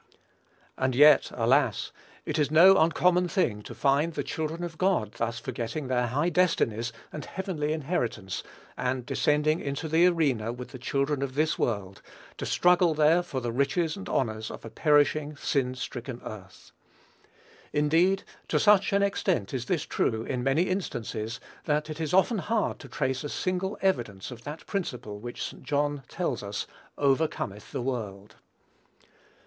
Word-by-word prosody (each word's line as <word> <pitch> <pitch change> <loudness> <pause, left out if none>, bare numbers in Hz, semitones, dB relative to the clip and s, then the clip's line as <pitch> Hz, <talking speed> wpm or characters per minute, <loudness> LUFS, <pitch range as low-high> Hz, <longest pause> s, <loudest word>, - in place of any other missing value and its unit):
And 130 -1 +1
yet, 145 +1 +7
alas! 120 -1 +2 0.3
it - - -2
is 145 -2 +2
no 175 +5 +8
uncommon 175 +3 +3
thing 125 - 0
to - - -9
find 145 +4 +2
the 145 - -1
children 160 +4 -3
of 165 -3 -6
God 185 - +1
thus 115 +1 -3
forgetting 130 +4 -4
their 125 -1 +1
high 145 +8 +1
destinies 120 -11 +1 0.2
and 150 - -5
heavenly 180 -6 -3
inheritance, 125 - -2 0.3
and 125 -1 -2
descending 150 +4 +2
into 140 +3 -3
the 165 +3 +5
arena 140 -11 +1
with 125 +1 -8
the 130 - -9
children 140 +2 -1
of 135 -1 -3
this 155 +2 +1
world, 100 -3 -2 0.4
to - - -3
struggle 180 -2 +4
there 155 +3 +4
for 140 -7 -4
the 120 -1 -2
riches 155 +6 0
and 195 - -8
honors 110 -4 -1
of - - -9
a 115 - -8
perishing, 150 0 +2
sin 130 -3 0
stricken 125 0 -6
earth. 95 -3 -10 1.0
Indeed, 165 +6 +3 0.2
to - - +1
such 205 -2 +4
an 200 0 +3
extent 185 - 0
is 125 -2 -2
this 170 -5 0
true, 110 -1 0
in 125 +1 -3
many 135 +6 +2
instances, 120 - -3 0.3
that 150 +1 0
it 155 +1 -6
is 155 - -2
often 190 +4 +3
hard 215 +2 -1
to 135 - -10
trace 130 +3 -1
a 145 - -4
single 185 +3 -2
evidence 120 - -1
of 120 -1 -10
that 150 +2 -7
principle 125 - -4
which 120 +2 -6
St. - - -7
John 145 0 0
tells 150 -10 -2
us 100 0 -4 0.3
"overcometh 135 -7 0
the 135 -4 -3
world." 105 -5 -5
145 Hz, 160 wpm, -28 LUFS, 120-165 Hz, 1.0 s, no